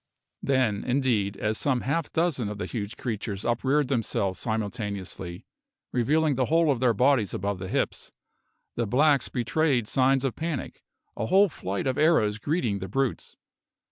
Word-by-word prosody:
Then, 130 -7 +1
indeed, 120 -7 0
as 110 +1 -1
some 130 -4 +1
half 150 +4 -1
dozen 160 -10 0
of 105 - -5
the 105 - -3
huge 110 -1 -5
creatures 105 -4 -4
upreared 130 +5 +1
themselves 110 -7 -1
simultaneously, 100 -4 -4 0.5
revealing 150 +5 +2
the 130 -1 +1
whole 165 +2 +3
of 130 - -1
their 120 -3 +3
bodies 125 -3 +2
above 100 0 -2
the 95 - -5
hips, - - -2 0.6
the 120 -2 -1
blacks 140 +3 +3
betrayed 125 -1 +1
signs 135 +2 +2
of 130 - -1
panic, 160 -4 -4 0.3
a 110 - -2
whole 195 - +5
flight 100 - -4
of 130 0 0
arrows 110 -10 +3
greeting 120 - -1
the 95 - -5
brutes. 135 +4 -2
125 Hz, 155 wpm, -26 LUFS, 105-140 Hz, 0.6 s, whole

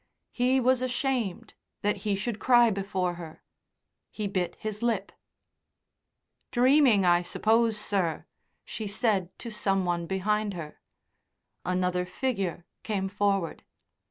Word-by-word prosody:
He 255 +2 +2
was 255 0 +3
ashamed 255 - -2 0.3
that 205 0 +1
he 200 +1 -1
should 210 +2 -3
cry 240 -2 +5
before 190 -2 -1
her. 160 -2 -10 0.7
He 215 - -5
bit 185 -3 -1
his 215 0 -5
lip. 225 -5 0 1.4
"Dreaming, 250 -5 +5
I 175 0 +5
suppose, 220 +5 +2
sir," 190 -6 -1 0.4
she 220 - -5
said 200 -3 0
to 235 - -7
some 195 -3 0
one 170 -1 -1
behind 205 +2 0
her. 155 -3 -8 0.8
Another 180 0 0
figure 190 -5 -2 0.2
came 195 -3 -2
forward. 195 -3 0
200 Hz, 120 wpm, -28 LUFS, 185-235 Hz, 1.4 s, cry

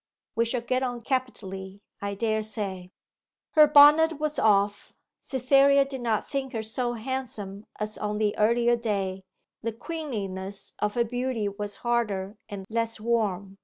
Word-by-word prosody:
We 230 - +2
shall 235 +1 -1
get 255 +2 0
on 245 -2 -2
capitally, 200 -7 -4 0.2
I 200 0 -3
dare 220 +1 0
say.' 200 -4 -4 0.6
Her 305 -2 +7
bonnet 300 +2 +7
was 305 0 -1
off. 205 -1 +2 0.3
Cytherea 275 +1 +4
did 270 -2 -6
not 225 -3 0
think 270 -2 -3
her 225 -1 -2
so 240 +2 -1
handsome 225 -5 -5
as 215 0 -3
on 210 0 -2
the 210 -1 +1
earlier 235 +2 +3
day; 200 -5 -2 0.4
the 230 - -2
queenliness 205 - -5
of 210 0 -1
her 240 - +3
beauty 245 -2 -2
was 205 0 -4
harder 210 -4 0
and 195 -2 -6
less 230 0 -2
warm. 205 -4 -1
225 Hz, 150 wpm, -27 LUFS, 205-255 Hz, 0.6 s, Her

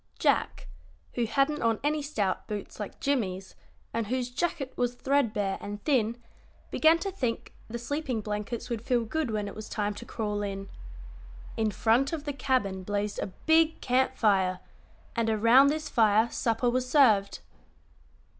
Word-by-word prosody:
Jack, - - +1 0.5
who 240 - 0
hadn't 280 +5 +1
on 225 -2 +1
any 300 +1 +1
stout 215 -10 -2
boots 210 0 -6
like 210 - -6
Jimmie's, 195 -9 -1 0.4
and 230 -2 -1
whose 250 +1 -2
jacket 275 -1 -2
was 245 0 -1
threadbare 230 -8 0
and 205 0 -6
thin, 235 -6 +1 0.5
began 320 +1 +5
to 390 +3 -4
think 250 -11 -3
the 235 - -5
sleeping 260 0 -3
blankets 210 +3 -4
would 235 -3 -3
feel 240 -1 0
good 310 +4 -2
when 210 -2 -2
it 200 - -6
was 215 0 -8
time 210 -1 -1
to 220 - -9
crawl 210 -3 -3
in. 195 -1 -4 0.9
In 220 -1 +1
front 230 - +2
of 310 -3 -3
the 290 -1 -3
cabin 250 -9 0
blazed 205 +2 -2
a - - -2 0.2
big 320 0 +4
camp 260 +1 +1
fire, 190 -6 +2 0.6
and 230 -2 +1
around 230 +5 +6
this 305 +2 -1
fire 220 0 +3
supper 230 +1 0
was 255 +1 0
served. 220 -9 +4
235 Hz, 160 wpm, -28 LUFS, 210-275 Hz, 0.9 s, around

